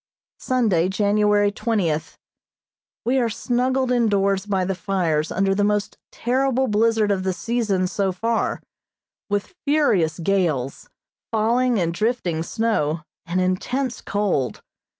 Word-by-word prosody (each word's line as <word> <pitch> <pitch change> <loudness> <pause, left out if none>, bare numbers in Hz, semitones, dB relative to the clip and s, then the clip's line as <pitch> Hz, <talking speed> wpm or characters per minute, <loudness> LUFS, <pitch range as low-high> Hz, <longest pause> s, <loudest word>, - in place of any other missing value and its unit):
Sunday, 210 -9 +1
January 205 0 +2
twentieth: 195 -8 -1 0.9
We 260 +3 +2
are 235 -2 +1
snuggled 250 +3 0
indoors 200 -4 +2
by 190 -2 0
the 195 - -1
fires 175 -5 -1
under 195 +1 +1
the 205 +1 +1
most 210 0 0 0.2
terrible 265 +1 +1
blizzard 220 -1 +2
of 195 -2 0
the 190 0 -1
season 215 -3 0
so 195 +1 0
far, 225 +5 -1 0.7
with 205 - -2
furious 210 - +2
gales, 165 -8 -1 0.4
falling 235 +2 +2
and 170 -2 0
drifting 185 -5 -1
snow, 165 -6 0 0.3
and 175 +2 0
intense 240 +8 -1
cold. 195 -11 -1
205 Hz, 120 wpm, -22 LUFS, 185-230 Hz, 0.9 s, January